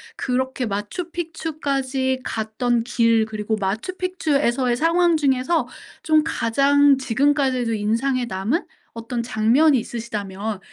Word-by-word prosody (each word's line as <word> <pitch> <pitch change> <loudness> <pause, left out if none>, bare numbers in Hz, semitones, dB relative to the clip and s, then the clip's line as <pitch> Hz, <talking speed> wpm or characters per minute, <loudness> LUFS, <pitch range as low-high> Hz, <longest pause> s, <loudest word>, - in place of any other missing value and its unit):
그렇게 260 0 -2
마추픽추까지 275 - -3
갔던 225 +2 -1
길 230 -2 +2
그리고 215 0 -3
마추픽추에서의 260 - -1
상황 335 +2 +3
중에서 280 +3 +1 0.4
좀 310 -1 +4
가장 280 +1 +3
지금까지도 260 -1 +1
인상에 230 +5 0
남은 220 - -2 0.3
어떤 230 +1 -4
장면이 250 +6 +3
있으시다면 215 -3 -5
255 Hz, 280 characters per minute, -22 LUFS, 225-285 Hz, 0.4 s, 좀